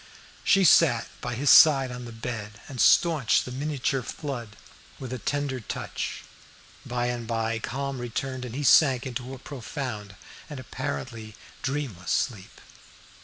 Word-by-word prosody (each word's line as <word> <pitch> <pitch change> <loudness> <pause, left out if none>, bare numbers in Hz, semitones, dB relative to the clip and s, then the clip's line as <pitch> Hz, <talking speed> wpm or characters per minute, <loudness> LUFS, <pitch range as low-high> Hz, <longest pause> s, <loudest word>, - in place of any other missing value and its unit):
She 195 - +4
sat 150 -8 +5
by 120 -1 -3
his 135 +3 +3
side 135 -5 +7
on 125 0 -7
the 120 - -8
bed, 115 -2 -6
and 130 -4 -3
staunched 155 -8 +4
the 125 - -7
miniature 135 0 -1
flood 120 -4 -6 0.4
with 130 -2 -6
a 130 - -4
tender 145 +1 -2
touch. 110 - -5 0.6
By 120 0 -2
and 120 -2 -3
by 115 -1 -1
calm 135 +3 -4
returned, 130 +2 -4
and 125 -1 -7
he 145 - -3
sank 135 -3 +5
into 130 +1 -5
a - - -10
profound 125 -6 -6 0.3
and 145 -3 -7
apparently 110 - -5 0.3
dreamless 130 -11 -3
sleep. 105 -7 -2
125 Hz, 145 wpm, -26 LUFS, 115-140 Hz, 0.6 s, side